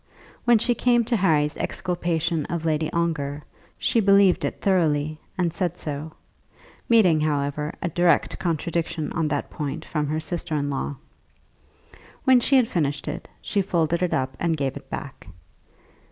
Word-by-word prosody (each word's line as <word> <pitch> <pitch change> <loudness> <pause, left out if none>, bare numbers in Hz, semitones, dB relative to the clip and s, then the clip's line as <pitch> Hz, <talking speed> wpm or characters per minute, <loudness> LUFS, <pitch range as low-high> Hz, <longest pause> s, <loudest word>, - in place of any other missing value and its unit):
When 240 -1 +6
she 240 +3 +1
came 240 -1 +2
to 235 - 0
Harry's 155 -7 +2
exculpation 170 -3 -1
of 170 -1 -3
Lady 155 0 0
Ongar, 150 -4 -1 0.3
she 230 - +2
believed 200 -2 +5
it - - -2
thoroughly, 155 -5 +1 0.2
and 175 -3 0
said 175 -2 -2
so, 150 +1 -5 0.8
meeting, 185 -10 +5
however, 150 0 -1
a 170 - 0
direct 170 -1 +2
contradiction 165 -2 -2
on 165 -2 0
that 145 -1 -2
point 145 -2 -4
from 150 -2 -2
her 155 +2 -1
sister 165 0 -3
in 145 -1 -1
law. 140 +1 -3 1.3
When 260 -2 +6
she 275 +3 +2
had 255 -3 +5
finished 150 -7 -1
it, - - -5 0.2
she 205 - +1
folded 170 -2 0
it 180 - +1
up 130 0 -1
and 165 -2 0
gave 135 -2 -1
it 140 - -10
back. 135 -8 -7
165 Hz, 155 wpm, -24 LUFS, 150-180 Hz, 1.3 s, When